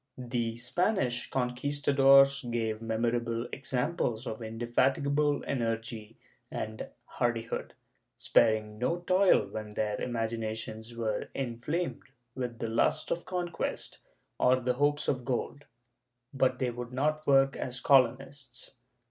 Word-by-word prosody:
The 120 -2 -2
Spanish 125 - 0
Conquistadores 135 +1 +4
gave 110 -2 -1
memorable 115 +1 -1
examples 125 -3 -1
of 110 -1 -5
inde 115 +1 -5
fatigable 140 +4 +2
energy 115 -3 -3 0.3
and 110 0 -5 0.2
hardihood, 115 -1 -2 0.4
sparing 110 -1 +2
no 170 +8 0
toil 185 +2 +4
when 105 -1 -7
their 105 -1 -1
imagi 115 -1 -2
nations 110 +1 -5
were 110 -3 -2
inflamed 135 +7 -2 0.3
with 125 -3 -4
the 115 - -3
lust 115 +1 +1
of 170 - -2
conquest 175 -2 -3 0.4
or 125 +1 +5
the 125 0 0
hopes 145 +3 +1
of 130 -3 0
gold, 135 +3 -3 0.7
but 130 -1 +2
they 125 -1 0
would 120 0 -7
not 155 +4 -1
work 135 -1 +5
as 125 -1 -3
colonists. 130 0 +1
125 Hz, 120 wpm, -30 LUFS, 115-140 Hz, 0.7 s, or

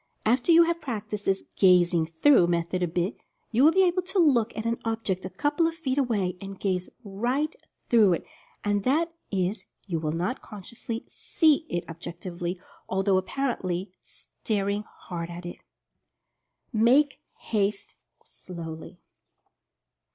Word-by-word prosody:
After 245 +8 +3
you 335 +1 +8
have 335 0 -1
prac 220 -7 -4
ticed 210 -1 -5
this 195 0 +1
"gazing 175 -3 +4
through" 175 - +5
method 170 +1 0
a 180 - +2
bit, 175 +6 -1 0.3
you 240 +3 +3
will 310 - +8
be 380 +2 +4
able 365 0 +2
to 365 +3 -4
look 265 - +4
at 220 - -3
an 230 0 0
object 220 -5 -2
a - - -4
couple 295 - +1
of 330 - -3
feet 285 -5 -1
away, 205 -9 0
and 195 -1 -8
gaze 185 -2 -1
right 245 +10 -1 0.3
through 220 -7 +5
it 170 - -3 0.2
— - - -21
that 260 - +1 0.2
is, 195 +2 -1 0.2
you 170 -5 -2
will 155 -1 -2
not 180 +11 -2
consciously 225 +3 -7
"see" 315 -1 +2
it 175 0 -3
objectively, 175 +2 -6 0.3
although 190 0 +2
apparently 190 -4 -2
staring 205 -2 -3 0.2
hard 170 -2 -5
at 175 +1 -8
it. 175 - -8 1.1
MAKE 260 +6 +4 0.2
HASTE 205 -2 -1 0.3
SLOWLY. 165 -3 -8
205 Hz, 145 wpm, -27 LUFS, 180-260 Hz, 1.1 s, you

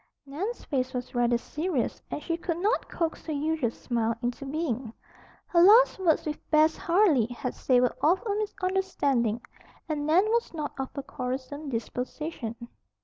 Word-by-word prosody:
Nan's 365 - -4
face 260 -2 -1
was 250 0 -4
rather 240 -1 +3
serious 300 +2 -2
and 295 - -4
she 335 - -1
could 335 0 -3
not 410 +7 0
coax 330 -1 -3
her - - -2
usual 300 -3 0
smile 230 -1 -1
into 245 +3 -3
being. 270 -6 -2 0.5
Her 340 - +3
last 435 +5 +7
words 340 -5 +2
with 300 -1 -4
Bess 310 +1 +5
Harley 335 - +3
had 245 +1 -4
savored 250 -1 +2
of 345 +5 +4
a 415 - 0
misunderstanding, 370 - 0 0.5
and 300 -2 -2
Nan 345 +6 +5
was 465 -6 0
not 300 -2 -3
of 265 - -2
a 280 - -4
quarrelsome 270 +3 -5
disposition. 245 +1 -4
295 Hz, 155 wpm, -28 LUFS, 250-340 Hz, 0.5 s, last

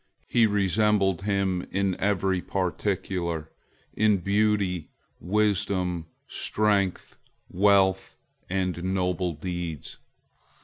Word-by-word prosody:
He 115 -2 +4
resembled 100 -2 +2
him 100 -3 0
in 95 -1 0
every 95 -2 +1
particular—"in 90 +2 -2
beauty, 100 -3 0 0.3
wisdom, 95 -3 0 0.2
strength, 100 -3 0 0.3
wealth, 95 0 +2 0.3
and 90 -2 -1
noble 90 -1 0
deeds." 85 -2 -6
95 Hz, 75 wpm, -26 LUFS, 90-100 Hz, 0.3 s, He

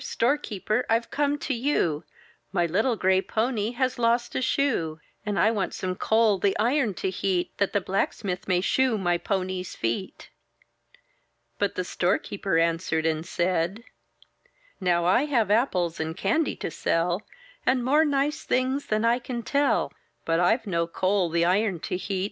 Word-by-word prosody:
Storekeeper! 235 -3 0
I've 230 +1 +1
come 290 0 +1
to 290 - -3
you; 230 - 0 0.5
My 175 -3 +1
little 215 +9 +1
gray 190 -2 +2
pony 225 +1 -1
has 255 0 -1
lost 235 +1 +1
a - - -1
shoe! 175 - 0 0.3
And 205 -1 -1
I 220 - +4
want 210 -4 -2
some 185 -1 -2
coal 220 +1 +2
the 195 +1 +1
iron 235 -2 +1
to 190 - -2
heat, 185 -1 -1
That 200 - +1
the 205 - +1
blacksmith 190 0 -2
may 180 -2 +2
shoe 255 +3 +2
my 175 -3 +1
pony's 185 -2 -3
feet." 115 +12 -4 1.3
But 200 -1 0
the 185 - -1
storekeeper 190 +1 -1
answered 165 -1 +1
and 160 -1 0
said: 175 +4 -1 0.5
— - - -38 0.2
"Now 175 -2 +2
I 215 +10 +4
have 235 -9 +1
apples 180 -8 +1
and 160 +2 -3
candy 320 +6 +1
to - - -5
sell. 175 +5 0 0.4
And 255 -2 +1
more 295 +4 +4
nice 290 0 0
things 260 +2 0
than 215 +1 +1
I 235 +2 +3
can 240 -1 -5
tell; 280 - +1 0.3
But 165 0 +1
I've 220 +7 +2
no 170 -4 0
coal 185 +1 +1
the 170 +1 +2
iron 190 0 +1
to - - -3
heat. 190 +1 -3
200 Hz, 165 wpm, -26 LUFS, 175-240 Hz, 1.3 s, I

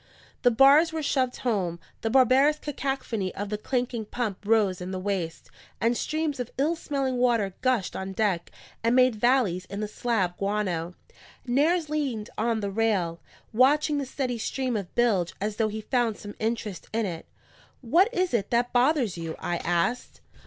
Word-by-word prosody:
The 245 - +5
bars 275 +7 +6
were 320 -1 -3
shoved 260 -3 0
home; 185 -8 0 0.2
the 225 - -1
barbarous 265 +4 +5
cacophony 270 -9 -3
of 205 0 -4
the 210 - -2
clanking 245 -1 -2
pump 210 -3 -3
rose 205 -4 +2
in 180 - -5
the 190 - -3
waist; 185 -4 -3 0.3
and 235 +1 +2
streams 310 +1 -2
of 245 -1 -3
ill 300 +5 +1
smelling 275 -5 -2
water 230 -6 +2
gushed 255 -7 +1
on 190 0 -4
deck 190 -4 0 0.3
and 230 +2 +3
made 255 -1 +5
valleys 215 -6 +2
in 200 - -6
the 215 - -2
slab 210 -5 -1
guano. 185 -4 -1 0.5
Nares 305 +7 +2
leaned 275 -8 -2
on 225 0 0
the 200 -1 -2
rail, 195 -6 0 0.3
watching 290 +5 +3
the 275 - -3
steady 255 -3 -3
stream 255 +2 -2
of 200 -4 -5
bilge 210 -8 +2
as 210 +1 -3
though 220 - +2
he 215 +1 -5
found 230 -1 0
some 205 -1 -9
interest 220 -3 -3
in 225 0 0
it. 170 -4 -6 0.5
"What 340 - +3
is 370 - 0
it 205 -4 0
that 240 +1 +1
bothers 250 - +2
you?" 165 -1 -4
I 175 - -2
asked. 175 +9 -1
230 Hz, 175 wpm, -26 LUFS, 200-260 Hz, 0.5 s, bars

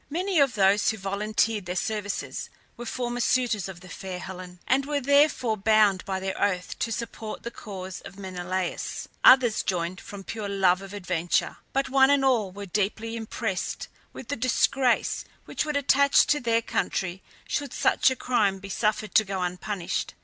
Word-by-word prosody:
Many 360 +3 0
of 275 -5 +3
those 200 0 +4
who 220 - -1
volunteered 210 +1 -1
their 180 - -3
services 205 +2 -3 0.3
were 240 - -8
former 245 0 -3
suitors 235 -6 +1
of 175 -2 -10
the 185 - -12
fair 185 0 -6
Helen, 180 -1 -8
and 265 +2 +3
were 290 -1 0
therefore 280 -4 +3
bound 210 -2 +3
by 190 -1 -2
their 190 0 -3
oath 185 -3 -1
to 230 - -1
support 225 -1 -5
the 235 - -5
cause 190 -5 -7
of 190 - -11
Menelaus; 185 -1 -4 0.2
others 250 -4 +7
joined 180 0 -2
from 200 -1 -9
pure 210 0 -5
love 190 -2 +3
of 195 +1 -9
adventure, 180 -3 -1
but 275 0 0
one 265 0 +5
and 280 -1 +3
all 230 -8 +2
were 200 +2 -7
deeply 210 +4 -2
impressed 220 -3 -3 0.2
with - - -10
the 285 - -1
disgrace 255 +1 +1 0.2
which - - -2
would 300 -2 -1
attach 280 0 +4
to 295 - +2
their 230 -2 +1
country 190 -4 -2 0.3
should 285 -3 -2
such - - +3
a 260 - -2
crime 210 -7 +1
be 195 +1 -10
suffered 215 -1 -1
to 215 - +6
go 190 -2 -3
unpunished. 180 +1 -3
210 Hz, 175 wpm, -26 LUFS, 190-245 Hz, 0.3 s, others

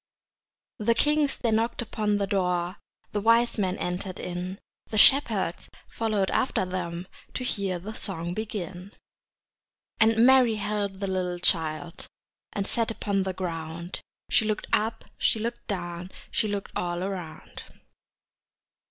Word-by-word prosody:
The 230 +2 +3
kings 295 +2 +2
they 235 - 0
knocked 225 +2 +1
upon 210 -3 0
the 200 - +1
door, 180 -2 0 0.3
The 205 - -1
wise 230 +1 +4
men 185 -2 +1
entered 180 +1 -3
in, 180 +2 -4 0.3
The 215 - -3
shepherds 210 - +4 0.2
followed 215 -4 0
after 225 - +1
them 180 -1 -3 0.3
To 255 - -2
hear 200 -6 -1
the 200 +6 -7
song 175 -5 -2
begin. 195 -3 -5 1.1
And 225 +1 +6
Mary 255 -3 +6
held 205 -2 -2
the 195 - 0
little 180 -2 -1
child 165 0 0 0.4
And 200 - -2
sat 230 +1 +1
upon 200 -3 0
the 190 0 -1
ground; 170 -1 -4 0.3
She - - +5
looked 215 -1 -1
up, 220 +1 +1
she - - +3
looked 235 +2 -4
down, 175 -2 -4 0.2
She 220 - +1
looked 205 -1 -3
all 175 0 -1
around. 185 -5 -6
195 Hz, 135 wpm, -27 LUFS, 180-220 Hz, 1.1 s, And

